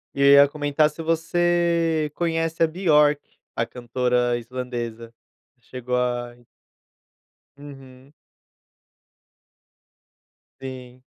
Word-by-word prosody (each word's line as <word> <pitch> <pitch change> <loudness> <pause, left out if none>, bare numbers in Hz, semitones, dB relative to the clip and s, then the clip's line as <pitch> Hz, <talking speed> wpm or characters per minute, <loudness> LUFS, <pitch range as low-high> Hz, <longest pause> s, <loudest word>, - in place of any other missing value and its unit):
E 140 - -2
eu - - +5
ia 140 0 +8
comentar, 145 +1 +1
se 160 +2 -9
você 165 -1 0
conhece 165 -1 -1
a 165 - +4
Björk, 150 -4 +3 0.4
a 115 - 0
cantora 125 0 -1
islandesa. 120 -2 -6 0.5
Chegou 125 +1 -5
a 120 -1 -2 1.2
Uhum. 135 -1 -14 2.5
Sim. 130 -1 -9
140 Hz, 85 wpm, -23 LUFS, 125-160 Hz, 2.5 s, ia